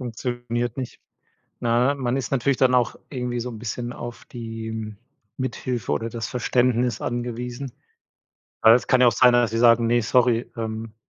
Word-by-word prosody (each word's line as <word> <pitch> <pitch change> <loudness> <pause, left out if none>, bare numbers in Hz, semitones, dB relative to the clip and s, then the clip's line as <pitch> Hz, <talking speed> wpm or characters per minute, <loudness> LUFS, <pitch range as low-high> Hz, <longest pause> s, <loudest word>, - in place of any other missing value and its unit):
Funktioniert 120 -1 -3
nicht. 130 -3 -6 0.6
Ne, 120 +4 +2
man 130 -1 -1
ist 135 -1 -4
natürlich 135 0 +1
dann 130 -1 +3
auch 125 -2 +2
irgendwie 125 -3 -3
so 125 +1 -4
'n 110 -3 -8
bisschen 120 +1 -4
auf 120 0 -8
die 110 -2 -6 0.4
Mithilfe 125 - -3
oder 115 +11 -1
das 115 0 -4
Verständnis 125 -1 +1
angewiesen. 120 +2 -4 0.9
Weil 110 +1 +8
es 120 - +1
kann 130 - +3
ja 125 - +7
auch 120 - +5
sein, 125 +1 +5
dass 120 -2 +3
sie 115 - -1
sagen: 115 0 +5
„Ne, 120 +1 +3
sorry, 120 0 +2
ähm, 110 0 -5
120 Hz, 170 wpm, -23 LUFS, 115-125 Hz, 0.9 s, Weil